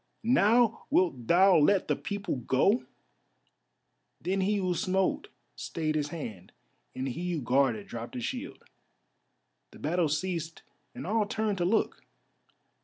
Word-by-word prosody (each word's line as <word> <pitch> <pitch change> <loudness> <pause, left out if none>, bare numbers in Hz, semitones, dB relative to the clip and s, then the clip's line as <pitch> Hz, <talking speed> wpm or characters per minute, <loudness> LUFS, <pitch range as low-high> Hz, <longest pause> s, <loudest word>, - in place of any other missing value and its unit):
"Now 230 0 +3
wilt 130 -11 +1
thou 185 +2 +6
let 185 +6 +3
the - - +1
people 200 -7 -4
go?" 135 - +2 1.3
Then 190 +2 -1
he 205 +3 +1
who 185 -3 0
smote 190 - 0 0.3
stayed 155 -2 -3
his 150 -1 0
hand 115 - -7 0.4
and 130 +1 -3
he 175 +7 -3
who 160 - -2
guarded 125 -4 +1
dropped 115 0 -7
his 120 - -3
shield. - - -6 1.0
The - - -15
battle 165 +1 0
ceased 165 +1 -3 0.3
and - - -6
all 210 +2 +1
turned 215 -3 -1
to 175 - +1
look. 220 +5 0
175 Hz, 135 wpm, -29 LUFS, 145-200 Hz, 1.3 s, thou